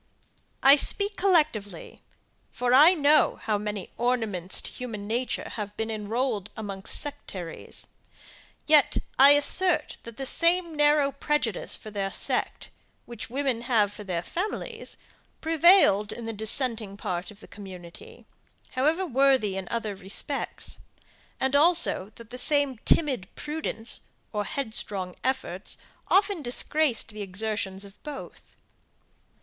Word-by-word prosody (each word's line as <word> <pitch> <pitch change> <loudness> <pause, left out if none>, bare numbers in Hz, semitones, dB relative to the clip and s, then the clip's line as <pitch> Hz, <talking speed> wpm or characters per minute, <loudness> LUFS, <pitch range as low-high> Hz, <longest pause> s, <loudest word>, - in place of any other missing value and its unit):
I 275 +2 +8
speak 400 +7 +2
collectively, 300 - 0 0.5
for 250 0 0
I 310 +8 +8
know 300 -1 +3
how 210 -2 0
many 210 -2 -5
ornaments 220 -7 0
to - - -7
human 225 -5 -7
nature 240 +4 -2
have 210 -1 -6
been 225 0 -2
enrolled 220 0 -2
amongst 195 -3 -1
sectaries; 195 - -7 0.8
yet, 300 -3 +4 0.2
I 280 +2 +9
assert, 305 +2 +3
that 230 -1 -11
the 270 - -4
same 340 +3 +3
narrow 295 -1 +3
prejudice 280 -6 -1
for 215 - -10
their 195 -1 -3
sect, - - -2 0.4
which 235 -2 -8
women 260 -2 -1
have 220 -4 +1
for 210 - -8
their 180 -3 -3
families, 435 - -5 0.4
prevailed 320 - +4
in 235 - -7
the 225 - -4
dissenting 220 -1 -1
part 180 -2 -4
of 210 -1 -14
the - - -14
community, 185 -4 -12 0.5
however 310 +8 +1
worthy 265 - +2
in 190 -1 -5
other 225 -3 -3
respects; 200 +9 -5 0.6
and 265 +1 0
also 305 - +3
that 230 0 -14
the 250 - -6
same 285 -3 +4
timid 265 - +2
prudence, 295 -7 -5 0.3
or 210 -1 -1
headstrong 210 -9 -4
efforts, 255 -8 -3 0.3
often 395 -3 +2
disgraced 270 0 -1
the 215 -1 -8
exertions 200 0 -1
of 200 0 -16
both. 295 -2 -10
240 Hz, 130 wpm, -26 LUFS, 205-290 Hz, 0.8 s, I